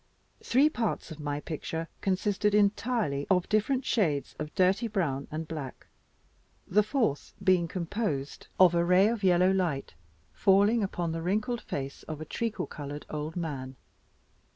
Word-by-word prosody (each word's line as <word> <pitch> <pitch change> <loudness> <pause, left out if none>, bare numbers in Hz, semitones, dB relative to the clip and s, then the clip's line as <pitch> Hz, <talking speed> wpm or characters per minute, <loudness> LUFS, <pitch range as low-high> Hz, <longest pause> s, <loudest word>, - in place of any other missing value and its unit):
Three 270 +5 +4
parts 230 - -2
of 160 - -8
my 145 -1 -3
picture 165 +1 -4
consisted 200 +2 +1
entirely 205 - +1
of 180 -2 +3
different 250 +5 +1
shades 160 - 0
of 150 0 -4
dirty 190 +5 +3
brown 160 -11 -1
and 155 +1 -5
black; 150 -5 -7 0.8
the 210 +4 +3
fourth 210 - -1
being 185 -3 +3
composed 170 -5 -3
of 185 -2 +7
a 170 0 +3
ray 180 +4 +5
of 225 -3 -3
yellow 180 0 +4
light 175 - -1 0.4
falling 205 +3 +4
upon 175 -4 -2
the 165 0 -3
wrinkled 215 +7 -1
face 140 0 -5
of 155 -1 -5
a 155 - -6
treacle 215 +2 -3
colored 145 -1 -7
old 155 +1 -4
man. 140 -6 -4
180 Hz, 150 wpm, -29 LUFS, 150-210 Hz, 0.8 s, of